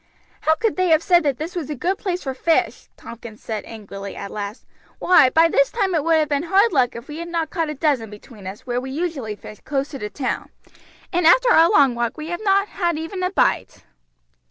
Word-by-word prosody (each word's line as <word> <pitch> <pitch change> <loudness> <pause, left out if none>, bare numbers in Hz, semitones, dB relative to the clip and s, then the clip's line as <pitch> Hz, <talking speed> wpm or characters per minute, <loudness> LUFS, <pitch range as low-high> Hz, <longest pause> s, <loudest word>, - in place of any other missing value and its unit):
"How 315 - +3
could 445 +4 -1
they 370 0 +2
have 320 -1 +4
said 350 -1 +4
that 285 -5 0
this 320 +4 -6
was 325 -6 -4
a 300 - -3
good 360 +9 -1
place 365 -2 -3
for 265 - -3
fish?" 325 +5 0
Tompkins 235 -2 -11
said 220 -2 -4
angrily 200 -3 -8
at 200 - -7
last. 205 +2 -6 0.3
"Why, 355 -8 +5
by 325 +5 +5
this 280 -4 +2
time 395 -5 -1
it 315 -4 +1
would 330 +1 +3
have 310 -1 +2
been 285 -1 +1
hard 400 +3 +4
luck 255 -4 +2
if 235 +2 -9
we 300 - -7
had 340 - -5
not 335 -2 -2
caught 330 -2 -1
a 300 - -4
dozen 275 -7 0
between 210 -1 -12
us 195 +2 -8
where 245 -1 -2
we 265 - -7
usually 275 -7 -3
fish 210 0 -12
close 275 -1 -2
to 275 - -7
the 210 - -4
town, 265 +2 -3 0.6
and 350 -2 +3
after - - +5
our 330 -3 +6
long 275 -4 +4
walk 235 +2 -2
we 310 +1 -6
have 345 +3 -4
not 395 0 +3
had 345 -6 -1
even 325 +4 -5
a 365 - +1
bite." 95 - 0
305 Hz, 235 wpm, -21 LUFS, 240-345 Hz, 0.6 s, our